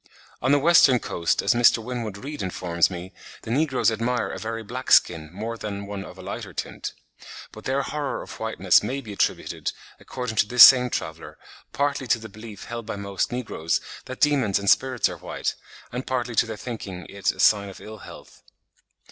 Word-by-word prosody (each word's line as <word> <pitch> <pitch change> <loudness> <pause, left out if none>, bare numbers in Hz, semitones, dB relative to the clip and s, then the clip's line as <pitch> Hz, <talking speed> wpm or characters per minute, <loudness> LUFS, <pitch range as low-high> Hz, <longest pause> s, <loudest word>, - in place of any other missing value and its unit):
On 130 - +2
the 145 - +6
western 145 -4 +6
coast, 85 -7 -1
as - - +3
Mr. 120 0 +5
Winwood 115 -3 -5
Reade 145 +7 -7
informs 90 -2 0
me, 90 0 -8 0.3
the 110 - -6
negroes 135 -3 +2
admire 115 +2 -1
a - - -6
very 115 0 -4
black 125 +4 -6
skin 80 -3 +4
more 110 +5 -5
than 100 -1 -5
one 100 -1 -6
of - - -12
a - - -10
lighter - - -6
tint. - - -5 0.6
But - - -12
their 135 +1 0
horror 145 -1 -3
of - - -11
whiteness - - +3
may 135 +2 -3
be 110 -5 -8
attributed, - - -1 0.3
according 125 -4 -6
to 105 - +4
this 120 +2 +9
same 125 -1 +8
traveller, 80 -7 -5 0.3
partly 140 -2 -1
to 120 - +3
the 110 -1 -10
belief 110 -1 -10
held 115 -1 -7
by - - -3
most 100 -1 -2
negroes 110 -10 -1 0.3
that 130 - -8
demons 135 -10 +3
and 100 - -5
spirits 130 -2 +2
are - - -7
white, - - -3 0.4
and 125 +2 -5
partly 125 -2 -2
to 115 - +2
their 110 -1 -6
thinking 100 -7 -7
it 100 0 -1
a - - -17
sign 100 -2 +4
of 95 - -11
ill 110 0 -10
health. - - -13
115 Hz, 195 wpm, -24 LUFS, 100-130 Hz, 0.6 s, this